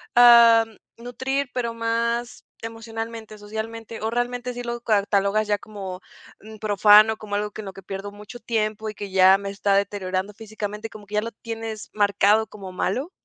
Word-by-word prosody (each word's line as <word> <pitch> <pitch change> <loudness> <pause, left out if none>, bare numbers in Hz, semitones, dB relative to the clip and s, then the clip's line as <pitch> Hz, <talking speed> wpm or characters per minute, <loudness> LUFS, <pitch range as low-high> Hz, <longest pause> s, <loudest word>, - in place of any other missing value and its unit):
am, 230 -2 +7 0.2
nutrir, 260 +3 -3
pero 235 -2 -2
más 235 +1 -2 0.2
emocionalmente, 225 -1 -7
socialmente, 220 +2 -7
o 220 - -1
realmente 245 +1 -2
sí 245 - -6
lo 240 0 -4
catalogas 205 -1 +1
ya 205 - +1
como, 195 -3 -8 0.4
mm, 220 0 -11
profano, 215 +1 +6
como 210 -2 -9
algo 210 0 -2
que 215 - -7
en - - -10
lo 195 - -7
que 195 - -11
pierdo 195 +2 -6
mucho 210 +4 -11
tiempo, 215 -2 -2
y 215 - -6
que 205 0 -6
ya 190 0 +6
me 200 0 -5
está 200 0 0
deteriorando 195 0 -1
físicamente, 215 0 -6
como 210 -2 -12
que 210 - -6
ya 210 - +3
lo 230 +1 -5
tienes 225 0 -7
marcado 205 +1 +3
como 195 -3 -10
malo. 250 - -2
215 Hz, 175 wpm, -23 LUFS, 205-230 Hz, 0.4 s, am